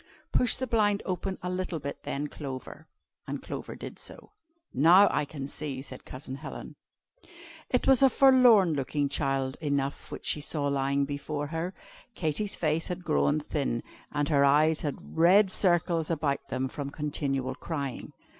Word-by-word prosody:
"Push 250 Hz, -, +4 dB
the 260 Hz, -, -2 dB
blind 210 Hz, -4 st, +1 dB
open 190 Hz, +1 st, -3 dB
a 180 Hz, -, -2 dB
little 180 Hz, -2 st, -2 dB
bit 140 Hz, -1 st, -6 dB
then 140 Hz, +2 st, -3 dB
Clover;" 145 Hz, +1 st, -8 dB, 0.4 s
and -, -, -5 dB
Clover -, -, -6 dB
did -, -, -9 dB
so. -, -, -9 dB, 0.4 s
"Now 180 Hz, +7 st, +7 dB
I -, -, 0 dB
can 140 Hz, -2 st, -6 dB
see," 140 Hz, -2 st, -4 dB
said 130 Hz, -2 st, -10 dB
Cousin 130 Hz, 0 st, -8 dB
Helen. 135 Hz, -, -8 dB, 0.9 s
It 250 Hz, -, +1 dB
was 270 Hz, -2 st, +5 dB
a 270 Hz, -, +7 dB
forlorn 245 Hz, -, +6 dB
looking 140 Hz, 0 st, -1 dB
child 135 Hz, -1 st, -1 dB
enough 140 Hz, -2 st, -2 dB
which -, -, -7 dB
she 150 Hz, -, +1 dB
saw 145 Hz, 0 st, -1 dB
lying 140 Hz, 0 st, +1 dB
before 145 Hz, +1 st, -4 dB
her. 170 Hz, +3 st, -3 dB, 0.4 s
Katy's 175 Hz, +5 st, -1 dB
face 160 Hz, 0 st, 0 dB
had 180 Hz, 0 st, -5 dB
grown 155 Hz, -2 st, +2 dB
thin, 140 Hz, -6 st, -2 dB, 0.3 s
and 145 Hz, -1 st, 0 dB
her 140 Hz, -3 st, +4 dB
eyes 150 Hz, +3 st, +4 dB
had 145 Hz, -2 st, -5 dB
red 185 Hz, +4 st, +5 dB
circles 175 Hz, -4 st, +2 dB
about 150 Hz, -4 st, -1 dB
them 130 Hz, +1 st, -1 dB
from 140 Hz, +1 st, -5 dB
continual 140 Hz, -3 st, -2 dB
crying. 140 Hz, -2 st, -5 dB
150 Hz, 160 wpm, -28 LUFS, 140-180 Hz, 0.9 s, Now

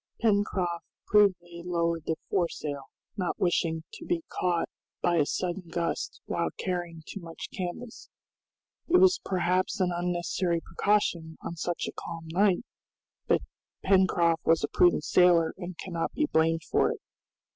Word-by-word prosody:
Pencroft 200 Hz, -5 st, +1 dB, 0.2 s
prudently 180 Hz, -5 st, +3 dB
lowered 170 Hz, -2 st, -1 dB
the 160 Hz, -, +1 dB, 0.2 s
foresail, 150 Hz, -6 st, -1 dB, 0.3 s
not 185 Hz, -3 st, -1 dB
wishing 165 Hz, -2 st, +1 dB
to -, -, -9 dB
be 345 Hz, -2 st, -1 dB
caught 175 Hz, -2 st, 0 dB, 0.3 s
by 175 Hz, -1 st, +2 dB
a 150 Hz, -3 st, +3 dB
sudden 180 Hz, 0 st, -2 dB
gust 170 Hz, 0 st, -3 dB
while -, -, -1 dB
carrying 175 Hz, -3 st, -3 dB
too -, -, -7 dB
much 165 Hz, -2 st, -8 dB
canvas; 195 Hz, +6 st, -6 dB, 0.8 s
it 360 Hz, -, +5 dB
was 370 Hz, 0 st, +5 dB
perhaps 185 Hz, +1 st, 0 dB
an 180 Hz, -1 st, +2 dB
unnecessary 175 Hz, 0 st, 0 dB
precaution 170 Hz, -4 st, 0 dB
on 170 Hz, -, -5 dB
such 175 Hz, +1 st, -2 dB
a -, -, -4 dB
calm 165 Hz, -1 st, -7 dB
night, 195 Hz, +3 st, +3 dB, 0.6 s
but -, -, +3 dB, 0.4 s
Pencroft 175 Hz, -4 st, +3 dB
was 165 Hz, 0 st, +3 dB
a -, -, +2 dB
prudent 175 Hz, -4 st, +4 dB
sailor 175 Hz, -2 st, +4 dB
and 180 Hz, -2 st, -7 dB
cannot 170 Hz, -3 st, -3 dB
be 305 Hz, -, +1 dB
blamed 165 Hz, -, +2 dB
for -, -, +2 dB
it. -, -, -6 dB
175 Hz, 145 wpm, -28 LUFS, 165-190 Hz, 0.8 s, it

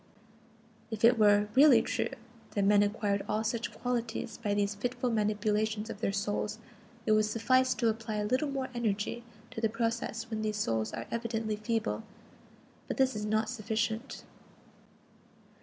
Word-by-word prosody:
If 220 Hz, -1 st, +1 dB
it 235 Hz, 0 st, +5 dB
were 205 Hz, -1 st, +5 dB
really 265 Hz, -3 st, +7 dB
true -, -, -1 dB, 0.5 s
that 200 Hz, -1 st, +2 dB
men 205 Hz, 0 st, +5 dB
acquired 205 Hz, -1 st, 0 dB
all 215 Hz, +1 st, 0 dB
such 225 Hz, +1 st, -2 dB
qualities 235 Hz, -3 st, -3 dB
by 205 Hz, -3 st, -1 dB
these 205 Hz, 0 st, +1 dB
fitful 245 Hz, +4 st, -2 dB
manipulations 215 Hz, 0 st, 0 dB
of 205 Hz, -, -9 dB
their 195 Hz, -, +1 dB
souls, 205 Hz, +1 st, -2 dB, 0.5 s
it -, -, +2 dB
would 215 Hz, 0 st, +5 dB
suffice 255 Hz, +4 st, +2 dB
to 235 Hz, -, +1 dB
apply 225 Hz, 0 st, -2 dB
a 210 Hz, 0 st, -1 dB
little 255 Hz, +7 st, +1 dB
more 270 Hz, -1 st, -3 dB
energy 225 Hz, 0 st, -2 dB, 0.3 s
to 225 Hz, -, -6 dB
the 225 Hz, -, +2 dB
process 230 Hz, 0 st, -2 dB
when 220 Hz, -1 st, -2 dB
these 215 Hz, -1 st, -1 dB
souls 110 Hz, -, 0 dB
are 115 Hz, -, -5 dB
evidently 225 Hz, -2 st, -2 dB
feeble. 225 Hz, +1 st, -1 dB, 0.9 s
But -, -, -3 dB
this 265 Hz, -3 st, +3 dB
is 210 Hz, 0 st, -3 dB
not 215 Hz, +1 st, +1 dB
sufficient. 225 Hz, +1 st, -2 dB
220 Hz, 155 wpm, -31 LUFS, 210-235 Hz, 0.9 s, really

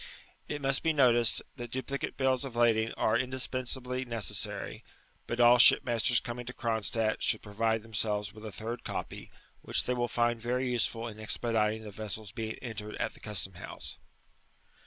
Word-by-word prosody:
It 145 Hz, -1 st, -5 dB
must 135 Hz, 0 st, +1 dB
be 165 Hz, -1 st, +2 dB
noticed, 120 Hz, -5 st, +4 dB
that 120 Hz, -1 st, -6 dB
duplicate 130 Hz, +3 st, -4 dB
bills 130 Hz, -1 st, +2 dB
of 130 Hz, -4 st, -6 dB
lading 115 Hz, -1 st, +3 dB
are 110 Hz, +2 st, +1 dB
mdispensably 130 Hz, 0 st, -2 dB
necessary; 115 Hz, -6 st, -3 dB, 0.4 s
but 120 Hz, -, -3 dB
all 120 Hz, 0 st, +7 dB
shipmasters 120 Hz, -1 st, +6 dB
coming 120 Hz, 0 st, -6 dB
to 125 Hz, -, -5 dB
Cronstadt 110 Hz, -1 st, 0 dB
diould -, -, +2 dB
provideUiem* 110 Hz, +1 st, -2 dB
selves 105 Hz, -1 st, 0 dB
with 110 Hz, 0 st, -12 dB
a 110 Hz, -, -6 dB
third 110 Hz, +5 st, -5 dB
copy, -, -, -6 dB, 0.3 s
which -, -, +1 dB
they 125 Hz, -, 0 dB
will 120 Hz, -1 st, 0 dB
find 120 Hz, 0 st, 0 dB
very 125 Hz, +2 st, -1 dB
useful 115 Hz, -1 st, 0 dB
in 110 Hz, -2 st, -9 dB
expediting 110 Hz, 0 st, +1 dB
the 105 Hz, -, -8 dB
vessel's 110 Hz, 0 st, -5 dB
being 110 Hz, 0 st, -4 dB
entered 105 Hz, -3 st, -6 dB
at -, -, -2 dB
the -, -, -15 dB
custom 100 Hz, -3 st, -2 dB
house. 85 Hz, -, -7 dB
115 Hz, 165 wpm, -30 LUFS, 110-125 Hz, 0.4 s, all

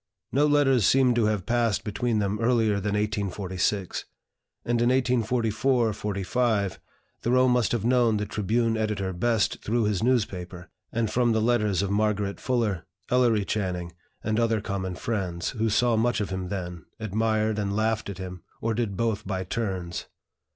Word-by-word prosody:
No 145 Hz, +4 st, +3 dB
letters 140 Hz, -5 st, +4 dB
seem 130 Hz, -2 st, +4 dB
to 115 Hz, -2 st, +2 dB
have 105 Hz, -3 st, 0 dB
passed 115 Hz, -2 st, +1 dB
between 115 Hz, +1 st, -1 dB
them 105 Hz, 0 st, 0 dB
earlier 115 Hz, -3 st, +2 dB
than 100 Hz, +1 st, -1 dB
1846; 100 Hz, -2 st, -1 dB, 0.6 s
and 120 Hz, 0 st, +1 dB
in 120 Hz, -, +3 dB
1844 120 Hz, -1 st, +1 dB
45 105 Hz, 0 st, -1 dB, 0.4 s
Thoreau 130 Hz, +2 st, +3 dB
must 125 Hz, -2 st, +2 dB
have 115 Hz, -3 st, -1 dB
known 120 Hz, -3 st, +3 dB
the 105 Hz, -, -2 dB
"Tribune" 110 Hz, +3 st, 0 dB
editor 105 Hz, -3 st, -1 dB
best 110 Hz, +4 st, 0 dB
through 115 Hz, +2 st, +1 dB
his 105 Hz, -2 st, 0 dB
newspaper, 95 Hz, -7 st, -1 dB, 0.2 s
and 115 Hz, -2 st, -1 dB
from 120 Hz, -2 st, +2 dB
the 110 Hz, -, +2 dB
letters 105 Hz, -5 st, +2 dB
of 100 Hz, -, -2 dB
Margaret 105 Hz, -1 st, 0 dB
Fuller, 115 Hz, -8 st, -1 dB, 0.2 s
Ellery 120 Hz, -5 st, +3 dB
Channing, 90 Hz, -5 st, -2 dB, 0.3 s
and 110 Hz, +1 st, 0 dB
other 115 Hz, -2 st, +2 dB
common 95 Hz, -3 st, -3 dB
friends, 90 Hz, -6 st, -2 dB
who 115 Hz, -3 st, 0 dB
saw 120 Hz, +2 st, +3 dB
much 115 Hz, 0 st, +1 dB
of 100 Hz, -2 st, -2 dB
him 95 Hz, -1 st, -3 dB
then, 90 Hz, -3 st, -5 dB
admired 110 Hz, 0 st, 0 dB
and 100 Hz, -1 st, -1 dB
laughed 110 Hz, -1 st, 0 dB
at 100 Hz, -, -6 dB
him, 90 Hz, -2 st, -7 dB, 0.2 s
or 115 Hz, 0 st, -1 dB
did 110 Hz, -4 st, -2 dB
both 110 Hz, -3 st, -1 dB
by 95 Hz, -2 st, -2 dB
turns. 95 Hz, -4 st, -3 dB
110 Hz, 160 wpm, -26 LUFS, 100-120 Hz, 0.6 s, letters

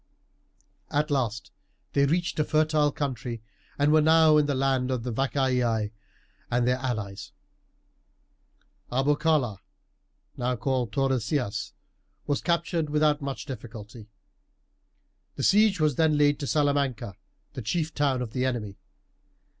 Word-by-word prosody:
At 150 Hz, +1 st, 0 dB
last 115 Hz, -6 st, -1 dB, 0.4 s
they 140 Hz, 0 st, +3 dB
reached 170 Hz, +2 st, -1 dB
a -, -, +4 dB
fertile 155 Hz, -1 st, +2 dB
country, 125 Hz, -6 st, -4 dB, 0.3 s
and 145 Hz, +1 st, +3 dB
were 155 Hz, -, +6 dB
now 160 Hz, 0 st, +5 dB
in 150 Hz, -1 st, +3 dB
the 145 Hz, -, 0 dB
land 130 Hz, -1 st, +1 dB
of 125 Hz, -3 st, -2 dB
the 125 Hz, -1 st, -3 dB
Vacaei 125 Hz, -5 st, 0 dB, 0.6 s
and 120 Hz, 0 st, +1 dB
their 125 Hz, 0 st, +2 dB
allies. 110 Hz, -7 st, -4 dB, 1.6 s
Arbocala, 135 Hz, -4 st, +1 dB, 0.8 s
now 125 Hz, +1 st, -1 dB
called 125 Hz, -2 st, -1 dB
Tordesillas, 130 Hz, -3 st, -1 dB, 0.5 s
was 145 Hz, -1 st, -1 dB
captured 170 Hz, -2 st, 0 dB
without 150 Hz, 0 st, +2 dB
much 140 Hz, -1 st, -5 dB
difficulty. 115 Hz, -5 st, -9 dB, 1.3 s
The -, -, -4 dB
siege 205 Hz, -2 st, +4 dB
was 155 Hz, 0 st, +1 dB
then 160 Hz, -2 st, +3 dB
laid 145 Hz, 0 st, +3 dB
to 145 Hz, -, -4 dB
Salamanca, 140 Hz, -8 st, 0 dB, 0.4 s
the 130 Hz, -, -5 dB
chief 155 Hz, +7 st, -2 dB
town 135 Hz, -4 st, +1 dB
of 115 Hz, -, -7 dB
the 125 Hz, -, -1 dB
enemy. 115 Hz, -6 st, -2 dB
135 Hz, 125 wpm, -27 LUFS, 120-150 Hz, 1.6 s, were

